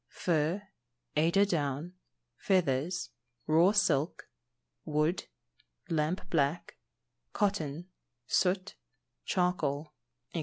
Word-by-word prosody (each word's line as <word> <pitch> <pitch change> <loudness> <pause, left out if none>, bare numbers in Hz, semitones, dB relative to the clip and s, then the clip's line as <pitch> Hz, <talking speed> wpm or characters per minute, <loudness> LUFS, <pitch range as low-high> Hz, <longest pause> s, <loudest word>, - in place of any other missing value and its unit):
_ - - -55
Fur, 170 +3 0 0.5
eider 170 +6 +4
down, 150 -2 -2 0.4
feathers, 175 -1 0 0.3
raw 165 +5 +5
silk, 170 -7 +1 0.5
wood, 155 +3 0 0.6
lamp 165 +3 0
black, 150 +1 0 0.6
cotton, 175 -6 -1 0.4
soot, 185 +7 +1 0.5
charcoal, 155 -5 0 0.4
&c. 170 - -1
165 Hz, 80 wpm, -31 LUFS, 150-185 Hz, 0.6 s, raw